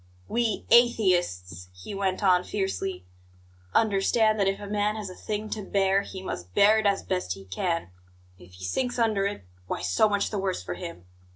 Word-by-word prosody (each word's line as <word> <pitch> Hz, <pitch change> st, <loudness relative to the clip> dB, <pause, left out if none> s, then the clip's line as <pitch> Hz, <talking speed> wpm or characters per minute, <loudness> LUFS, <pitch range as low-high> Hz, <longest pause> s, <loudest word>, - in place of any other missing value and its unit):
"We 230 Hz, -2 st, -1 dB
atheists," 175 Hz, -, +3 dB
he 90 Hz, -, -8 dB
went 195 Hz, 0 st, -1 dB
on 180 Hz, -2 st, +4 dB
fiercely, 195 Hz, -, -3 dB, 0.7 s
"understand 215 Hz, +1 st, +3 dB
that 200 Hz, -, +3 dB
if 195 Hz, 0 st, 0 dB
a 205 Hz, -, -7 dB
man 210 Hz, +1 st, 0 dB
has 210 Hz, -3 st, -5 dB
a -, -, -10 dB
thing 215 Hz, 0 st, -4 dB
to 215 Hz, -, -3 dB
bear, 195 Hz, 0 st, +2 dB
he 190 Hz, -1 st, -8 dB
must 90 Hz, -, -6 dB
bear 215 Hz, +2 st, +6 dB
it 215 Hz, -, +1 dB
as 200 Hz, -1 st, +1 dB
best 180 Hz, -, -2 dB
he 95 Hz, -, -12 dB
can; 165 Hz, -, -2 dB, 0.5 s
and 90 Hz, -, -14 dB
if 90 Hz, -, -21 dB
he 90 Hz, +1 st, -12 dB
sinks 245 Hz, -, -1 dB
under 215 Hz, -4 st, +2 dB
it 200 Hz, -, -6 dB, 0.2 s
why, -, -, -3 dB
so 90 Hz, -, +3 dB
much 205 Hz, -1 st, 0 dB
the 205 Hz, -, -2 dB
worse 190 Hz, -1 st, -2 dB
for -, -, -4 dB
him. 170 Hz, -, -8 dB
195 Hz, 195 wpm, -27 LUFS, 175-210 Hz, 0.7 s, bear